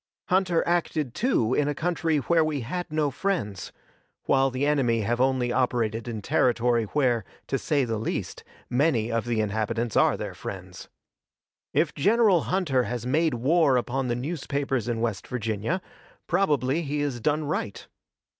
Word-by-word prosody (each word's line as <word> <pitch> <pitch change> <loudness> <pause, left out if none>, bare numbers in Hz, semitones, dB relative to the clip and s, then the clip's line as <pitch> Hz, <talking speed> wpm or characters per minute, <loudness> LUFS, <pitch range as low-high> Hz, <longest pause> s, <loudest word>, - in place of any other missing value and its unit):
Hunter 180 -2 +2
acted, 160 -6 0
too, 130 - +1
in 145 +1 +2
a 145 - -1
country 165 -1 0
where 165 +3 +2
we 155 -3 -1
had 175 +8 -4
no 155 -2 +1
friends, 125 - -2 0.5
while 135 0 +3
the 130 +2 -1
enemy 130 -6 +2
have 120 +4 0
only 130 -2 +2
operated 120 -3 0
in 110 -3 -5
territory 120 -1 +2
where, 120 -2 +1 0.2
to 135 - -1
say 145 -4 +1
the 115 -2 -2
least, 110 - -4 0.2
many 125 -4 +1
of 115 0 -1
the 115 -2 0
inhabitants 110 +2 -2
are - - +4
their - - -5
friends. - - -8 0.8
If 155 -2 +1
General 205 +1 +3
Hunter 150 -10 +1
has 120 -1 -4
made 155 +3 +2
war 140 +2 +3
upon 125 +2 -1
the 120 - 0
newspapers 135 -3 -2
in 115 -2 -1
West 115 -4 -2
Virginia, 115 - -2 0.4
probably 145 -5 +1
he 145 -1 -2
has 140 -4 -2
done 150 +6 0
right. 145 -9 -3
130 Hz, 155 wpm, -26 LUFS, 120-155 Hz, 0.8 s, are